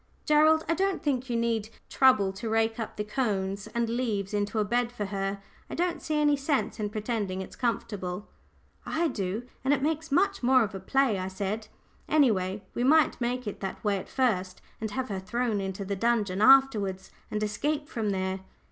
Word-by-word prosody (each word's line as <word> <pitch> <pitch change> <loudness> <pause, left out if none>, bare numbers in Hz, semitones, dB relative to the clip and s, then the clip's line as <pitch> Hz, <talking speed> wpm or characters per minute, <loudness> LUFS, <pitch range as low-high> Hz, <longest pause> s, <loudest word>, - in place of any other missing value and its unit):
Gerald, 310 +1 +5
I 330 - +2
don't 385 +1 0
think 260 -3 -1
you 235 - 0
need 230 -2 0 0.2
trouble 215 -8 +4
to 210 +4 -5
rake 225 +1 +1
up 225 - -5
the 210 - -1
cones 205 -4 -2
and 235 +1 -1
leaves 225 -4 -2
into 205 +1 -1
a 210 - +2
bed 240 +3 0
for 215 -4 -4
her. 195 0 -3 0.3
I - - -5
don't 350 0 -1
see 305 -1 -1
any 295 -1 +4
sense 275 -3 -1
in 210 -1 -1
pretending 210 -3 -2
it's 190 - -7
comfortable." 205 -5 -3 0.6
"I 330 +1 0
do 200 +1 -3 0.2
and 275 +2 +4
it 270 - -4
makes 320 +1 0
it 290 - -5
much 395 +4 +2
more 255 0 +5
of 210 - -4
a 195 - -5
play," 230 +1 +2
I 185 - -3
said. 200 +3 -3 0.4
"Any 290 -6 +5
way, 190 0 -2
we 240 - -1
might 305 +1 +4
make 250 +1 -1
it 205 - -5
that 195 -1 -5
way 205 -2 +1
at - - -10
first, 190 -8 0 0.2
and 220 - -3
have 260 +4 -3
her 195 -2 -2
thrown 225 +1 -1
into 195 +1 -4
the 200 +1 -2
dungeon 210 -3 +1
afterwards, 215 -7 +4 0.2
and 215 0 -2
escape 290 +8 -1
from 225 -8 -2
there." 190 -1 -1
225 Hz, 200 wpm, -28 LUFS, 200-265 Hz, 0.6 s, Gerald